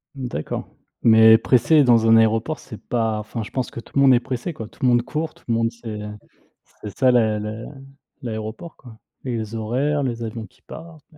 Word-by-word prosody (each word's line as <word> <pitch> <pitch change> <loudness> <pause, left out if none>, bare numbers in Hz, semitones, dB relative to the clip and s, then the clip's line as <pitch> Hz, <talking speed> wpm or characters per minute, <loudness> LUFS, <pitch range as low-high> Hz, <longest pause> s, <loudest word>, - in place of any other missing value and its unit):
D'accord, 125 - -5 0.3
mais 110 -1 +7
pressé 125 +6 +4
dans 115 -3 +4
un 115 - +6
aéroport, 115 +7 +2
c'est 110 -5 -10
pas 110 -3 -1
enfin, 110 +2 -6
je - - -10
pense 130 -2 -2
que 115 - -8
tout 140 - -10
le - - +5
monde 135 -2 +6
est 120 - +3
pressé, 130 +6 -4
quoi, 110 -4 -8
tout - - -24
le 130 - +2
monde 120 -1 +4
court, 155 +5 -4
tout - - -24
le - - +2
monde 115 0 +1
c'est 115 -3 -8 0.8
c'est 105 -2 -9
ça, 130 -1 +4
la 110 -3 +2
la 105 +2 -6 0.6
l'aéroport, 110 +8 -7
quoi, 115 -3 -15 0.3
les 115 -3 -4
horaires, 135 +7 -1
les 120 -2 -3
avions 115 0 -6
qui - - -30
partent. 160 -2 -12
115 Hz, 205 wpm, -22 LUFS, 110-130 Hz, 0.8 s, mais